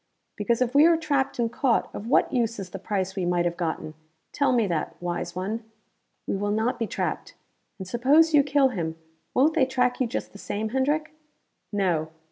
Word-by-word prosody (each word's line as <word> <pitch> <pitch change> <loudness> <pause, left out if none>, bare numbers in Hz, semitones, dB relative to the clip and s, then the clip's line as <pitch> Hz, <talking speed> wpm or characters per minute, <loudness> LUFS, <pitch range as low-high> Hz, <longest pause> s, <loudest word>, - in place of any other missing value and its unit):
"Because 235 +3 +1
if 250 0 -4
we 295 +3 +7
are 335 -1 +4
trapped 285 -4 0
and 230 -2 0
caught, 250 -3 +1
of 210 - -6
what 260 - +3
use 230 -2 0
is 190 -3 -7
the 195 - -6
price 190 -1 -2
we 190 - -2
might 175 0 +1
have 170 0 0
gotten? 160 -3 -3 0.4
Tell 280 -2 +1
me 240 -3 +3
that, 170 -5 -2
wise 175 0 -4
one?" 210 +5 -3 0.6
"We - - -1
will 205 +1 -1
not 225 +4 0
be 225 - -1
trapped. - - -3 0.4
And 190 -3 -7
suppose 285 - +4
you 295 - +7
kill 280 -1 +3
him 165 -9 -3 0.4
won't 290 +5 +4
they 275 -5 +3
track 250 -1 +1
you 255 - +2
just - - -4
the 200 - -13
same, 215 +2 -3
Hendrick?" 295 +5 0 0.6
"No. 175 -6 0
230 Hz, 200 wpm, -26 LUFS, 190-265 Hz, 0.6 s, we